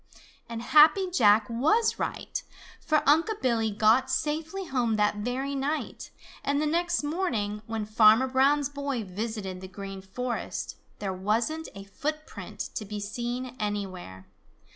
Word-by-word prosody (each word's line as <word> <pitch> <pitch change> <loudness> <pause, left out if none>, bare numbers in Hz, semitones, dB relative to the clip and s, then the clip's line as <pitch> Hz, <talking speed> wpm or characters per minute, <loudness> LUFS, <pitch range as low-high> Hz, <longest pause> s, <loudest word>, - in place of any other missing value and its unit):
And 230 0 -5
Happy 310 +8 +6
Jack 215 - +5
was 310 - +2
right, - - -3 0.4
for 310 -3 +1
Unc' 320 +8 +5
Billy 230 -3 +1
got 220 +5 +3
safely 320 +7 -2
home 245 -7 0
that 210 0 +1
very 250 +6 -2
night, 280 +3 -3 0.3
and 280 0 +1
the 305 - +1
next 345 +2 0
morning, 235 - -1
when 220 -1 -3
Farmer 215 +4 +5
Brown's 275 +2 +3
boy 280 -4 -3
visited 195 -1 -5
the 190 - -7
Green 195 0 -8
Forest, 240 +6 -4 0.2
there 195 -2 -3
wasn't 225 +12 -1
a 195 - -8
footprint 305 +10 -5
to - - -4
be 210 0 -6
seen 240 +4 -4
anywhere. 185 - -4
240 Hz, 140 wpm, -27 LUFS, 210-295 Hz, 0.4 s, Happy